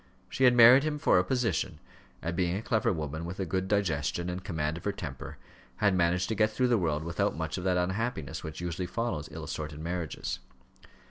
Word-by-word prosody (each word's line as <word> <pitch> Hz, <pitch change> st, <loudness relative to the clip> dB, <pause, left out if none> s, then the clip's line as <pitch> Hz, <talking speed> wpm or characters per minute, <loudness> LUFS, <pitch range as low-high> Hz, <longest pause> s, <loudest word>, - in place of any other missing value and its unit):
She 130 Hz, -, +2 dB
had 125 Hz, -1 st, +6 dB
married 120 Hz, +3 st, +9 dB
him 150 Hz, 0 st, -1 dB
for 145 Hz, -10 st, +4 dB
a -, -, +2 dB
position; 115 Hz, -3 st, -1 dB, 0.5 s
and 85 Hz, +1 st, -2 dB
being 90 Hz, -1 st, +1 dB
a 105 Hz, -, -5 dB
clever 110 Hz, -2 st, +1 dB
woman, 80 Hz, -2 st, -4 dB
with 90 Hz, +3 st, -6 dB
a 95 Hz, -, 0 dB
good 95 Hz, +3 st, -1 dB
digestion 85 Hz, -4 st, 0 dB
and 90 Hz, +1 st, -5 dB
command 80 Hz, -4 st, -2 dB
of -, -, -10 dB
her 100 Hz, -, +1 dB
temper, 70 Hz, -9 st, -7 dB, 0.4 s
had 100 Hz, -2 st, +2 dB
managed 90 Hz, +1 st, +2 dB
to -, -, +1 dB
get 110 Hz, +1 st, +3 dB
through 125 Hz, +3 st, +1 dB
the 120 Hz, -, +4 dB
world 80 Hz, -4 st, 0 dB
without 85 Hz, 0 st, -1 dB
much -, -, -3 dB
of -, -, -6 dB
that 90 Hz, -1 st, +2 dB
unhappiness 95 Hz, -, -2 dB
which 80 Hz, +1 st, -6 dB
usually 90 Hz, +1 st, -3 dB
follows 105 Hz, -8 st, -3 dB
ill -, -, -7 dB
assorted 75 Hz, -1 st, -5 dB
marriages. 80 Hz, -6 st, -3 dB
90 Hz, 210 wpm, -29 LUFS, 80-105 Hz, 0.5 s, married